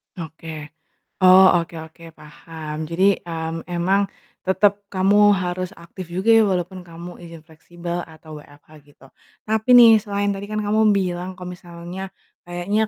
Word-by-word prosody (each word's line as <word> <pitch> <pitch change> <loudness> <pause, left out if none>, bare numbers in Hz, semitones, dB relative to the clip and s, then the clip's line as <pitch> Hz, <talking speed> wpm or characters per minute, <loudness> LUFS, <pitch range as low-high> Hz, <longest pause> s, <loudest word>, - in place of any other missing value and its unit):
Oke. 160 -2 -9 0.5
Oh, 185 +1 +8 0.2
oke 170 0 -14
oke, 165 +1 -18
paham. 155 0 -10
Jadi, 175 +3 -1 0.2
mmm, 165 0 -4
emang 180 +3 +1 0.4
tetep 200 +1 +1
kamu 205 +2 +4
harus 185 0 -3
aktif 170 +1 -10
juga 195 +5 -1
ya, 225 -1 +6
walaupun 185 0 -2
kamu 170 +1 -11
izin 165 -2 -12
fleksibel 170 +2 -7
atau 155 -1 -12
WFH 145 0 -19 0.2
gitu. 140 -2 -20 0.4
Tapi 220 +2 -1
nih 235 -2 +9
selain 205 -1 -2
tadi 200 +1 -6
kan 215 0 -2
kamu 210 +1 0 0.2
bilang 180 -1 -2
kalau 180 0 -8
misalnya 175 +2 -9 0.4
kayaknya 200 +5 -1
180 Hz, 145 wpm, -21 LUFS, 165-200 Hz, 0.5 s, nih